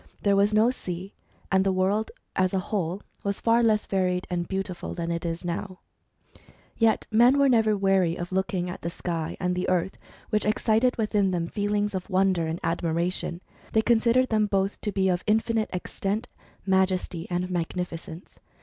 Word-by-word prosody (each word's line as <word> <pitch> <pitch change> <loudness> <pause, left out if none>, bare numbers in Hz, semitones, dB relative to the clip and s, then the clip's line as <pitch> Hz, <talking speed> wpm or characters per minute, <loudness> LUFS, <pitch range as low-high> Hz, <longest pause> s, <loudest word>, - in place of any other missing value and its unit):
There 200 -1 +4
was 200 +1 +3
no 215 +3 +4
sea; 185 -5 -6 0.4
and 190 0 +4
the 195 - +2
world 195 +4 +1 0.3
as 185 0 +1
a 185 - -3
whole 190 -2 -1 0.2
was 200 0 -1
far 230 +1 +3
less 215 -2 +2
varied 180 -1 0
and 175 -1 -1
beauti 190 -1 -2
ful - - -6
than 170 0 -3
it 170 0 -3
now 185 +2 -4 0.5
is. - - -21 0.4
Yet 225 -1 +2
men 240 +5 +5
were 280 0 +5
never 220 -4 +3
weary 195 -3 +2
of 175 +1 -5
looking 185 -1 -1
at 180 - -6
the 170 - -3
sky 170 -2 -4
and 180 -1 0
the 180 +1 -1
earth, 185 +1 0 0.3
which 215 - +2
excited 220 +3 +2
within 210 -3 +1
them 175 -2 -1
feelings 205 0 -1
of 185 0 -4
wonder 185 -3 +2
and 165 +2 -3
admiration. 170 +1 -1 0.3
They 220 - +3
considered 235 +2 +3
them 215 -1 +2
both 195 0 -1
to 210 - -2
be 190 -1 +1
of 180 -1 0
infinite 220 0 +1
extent, 195 +4 -3 0.4
majesty, 185 -3 +1
and 180 +1 -2
magnificence. 170 0 -5
190 Hz, 175 wpm, -26 LUFS, 180-215 Hz, 0.5 s, men